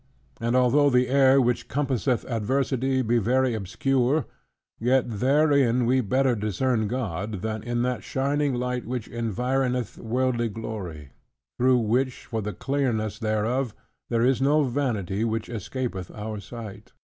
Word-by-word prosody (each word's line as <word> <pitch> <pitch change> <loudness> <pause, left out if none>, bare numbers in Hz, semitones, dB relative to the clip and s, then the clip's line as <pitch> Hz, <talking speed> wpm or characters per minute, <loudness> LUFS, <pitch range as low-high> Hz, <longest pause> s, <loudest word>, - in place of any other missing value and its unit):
And 115 +1 0
although 130 +3 +4
the 125 -1 +3
air 135 0 +5
which 120 -2 +1
compasseth 130 -2 0
adversity 130 +3 0
be 120 +1 +2
very 125 +3 +2
obscure; 125 - 0 0.5
yet 125 +2 +3
therein 130 +1 +3
we 130 +2 +3
better 130 +3 +2
discern 110 +2 0
God, 105 -4 -3
than 110 -1 -2
in 120 +1 -1
that 125 -1 -2
shining 140 0 0
light 125 0 -2
which 125 -2 -3
environeth 125 +2 -1
worldly 120 0 0
glory; 95 -10 -6 0.5
through 130 +1 +4
which, 125 +3 0
for 115 -2 -3
the 105 +1 -3
clearness 115 -4 -1
thereof, 110 +2 -1 0.3
there 115 0 +2
is 130 0 +2
no 145 +3 +4
vanity 115 -7 -1
which 115 -1 -2
escapeth 115 -4 -4
our 105 0 -6
sight. 110 -2 -9
120 Hz, 135 wpm, -25 LUFS, 110-130 Hz, 0.5 s, air